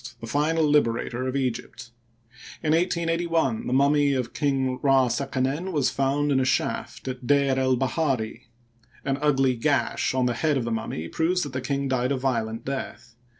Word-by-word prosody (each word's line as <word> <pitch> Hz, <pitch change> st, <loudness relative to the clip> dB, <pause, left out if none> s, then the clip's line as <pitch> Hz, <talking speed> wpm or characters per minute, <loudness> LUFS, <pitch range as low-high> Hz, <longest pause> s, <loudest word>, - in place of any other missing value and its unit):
the 115 Hz, -, -7 dB
final 150 Hz, +7 st, +1 dB
liberator 130 Hz, -3 st, +1 dB
of 130 Hz, -, -3 dB
Egypt. 125 Hz, -2 st, -3 dB, 0.7 s
In 155 Hz, -, +1 dB
1 165 Hz, +2 st, +4 dB
88 170 Hz, -1 st, -1 dB
1 135 Hz, -9 st, 0 dB
the -, -, -2 dB
mummy 140 Hz, +2 st, +3 dB
of 125 Hz, -3 st, -2 dB
King 135 Hz, -3 st, 0 dB
Ra 135 Hz, -2 st, +4 dB
seqenen 140 Hz, +7 st, -1 dB
was 145 Hz, -6 st, +1 dB
found 140 Hz, +2 st, 0 dB
in 135 Hz, -, +3 dB
a -, -, +2 dB
shaft 130 Hz, -, -2 dB
at 125 Hz, -1 st, -5 dB
D^r 140 Hz, -2 st, +3 dB
el 130 Hz, -1 st, +2 dB
bahari. 130 Hz, -3 st, -1 dB, 0.6 s
An 135 Hz, 0 st, -1 dB
ugly 135 Hz, -3 st, +2 dB
gash 140 Hz, +1 st, 0 dB
on 130 Hz, -1 st, +2 dB
the 125 Hz, -, +1 dB
head 150 Hz, +4 st, +1 dB
of 130 Hz, -, -1 dB
the 120 Hz, -, -2 dB
mummy 110 Hz, -7 st, -3 dB
proves 180 Hz, -, 0 dB
that 145 Hz, -3 st, -6 dB
the 130 Hz, -, -2 dB
king 140 Hz, +1 st, -2 dB
died 130 Hz, 0 st, 0 dB
a 140 Hz, -, +1 dB
violent 115 Hz, -3 st, -2 dB
death. 120 Hz, -3 st, -5 dB
135 Hz, 185 wpm, -25 LUFS, 125-145 Hz, 0.7 s, 1